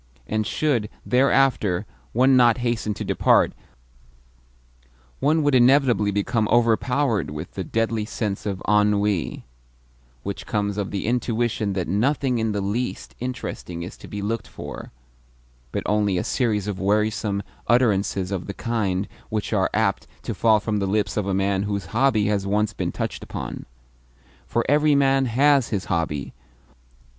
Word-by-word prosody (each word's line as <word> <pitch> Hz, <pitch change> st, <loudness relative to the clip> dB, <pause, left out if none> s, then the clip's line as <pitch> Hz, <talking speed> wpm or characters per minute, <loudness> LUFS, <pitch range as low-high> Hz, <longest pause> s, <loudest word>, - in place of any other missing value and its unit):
And 110 Hz, -, -1 dB
should, 125 Hz, -5 st, 0 dB, 0.2 s
thereafter, 125 Hz, -7 st, +2 dB, 0.3 s
one 130 Hz, +3 st, +4 dB
not 120 Hz, -2 st, +5 dB
hasten 115 Hz, -3 st, -1 dB
to -, -, -5 dB
depart, -, -, +3 dB, 1.7 s
one 155 Hz, +2 st, +2 dB
would 145 Hz, -1 st, +2 dB
inevitably 125 Hz, -4 st, +4 dB
become 105 Hz, +2 st, 0 dB
overpowered 120 Hz, -, +2 dB
with 75 Hz, +3 st, -6 dB
the 95 Hz, -, -4 dB
deadly 115 Hz, +3 st, -1 dB
sense 105 Hz, 0 st, -3 dB
of 95 Hz, -2 st, -3 dB
ennui 105 Hz, -3 st, +1 dB, 0.8 s
which 100 Hz, 0 st, -5 dB
comes 105 Hz, -3 st, -1 dB
of 100 Hz, -, -2 dB
the 100 Hz, -, -3 dB
intuition 115 Hz, -3 st, 0 dB
that 90 Hz, -3 st, -2 dB
nothing 125 Hz, -, +1 dB
in 110 Hz, -1 st, 0 dB
the 105 Hz, -1 st, -1 dB
least 110 Hz, +6 st, -3 dB
interesting 115 Hz, -8 st, -5 dB
is 90 Hz, -, -8 dB
to -, -, -12 dB
be 100 Hz, -1 st, -5 dB
looked 115 Hz, +2 st, -2 dB
for, -, -, -8 dB, 0.8 s
but -, -, -2 dB
only 105 Hz, -3 st, +1 dB
a -, -, 0 dB
series 110 Hz, -6 st, 0 dB
of 105 Hz, -3 st, -4 dB
wearisome 105 Hz, 0 st, 0 dB, 0.2 s
utterances 100 Hz, -5 st, +2 dB
of 95 Hz, -2 st, -3 dB
the 100 Hz, -, -5 dB
kind 105 Hz, -5 st, -1 dB, 0.2 s
which 105 Hz, -1 st, -2 dB
are -, -, +2 dB
apt -, -, 0 dB, 0.2 s
to -, -, -3 dB
fall 110 Hz, -2 st, +4 dB
from 105 Hz, 0 st, -2 dB
the 100 Hz, -1 st, -1 dB
lips 100 Hz, -1 st, 0 dB
of 105 Hz, -2 st, -1 dB
a 100 Hz, -, 0 dB
man 95 Hz, 0 st, +1 dB
whose 100 Hz, -1 st, -2 dB
hobby 115 Hz, -3 st, +3 dB
has 100 Hz, -2 st, 0 dB
once 105 Hz, +1 st, +1 dB
been -, -, -2 dB
touched -, -, -4 dB
upon. -, -, -6 dB, 0.8 s
For -, -, 0 dB
every 150 Hz, +1 st, +4 dB
man 135 Hz, -1 st, +3 dB
HAS 135 Hz, +2 st, +3 dB
his 100 Hz, -4 st, -2 dB
hobby. 75 Hz, -4 st, -2 dB
105 Hz, 150 wpm, -23 LUFS, 100-120 Hz, 1.7 s, not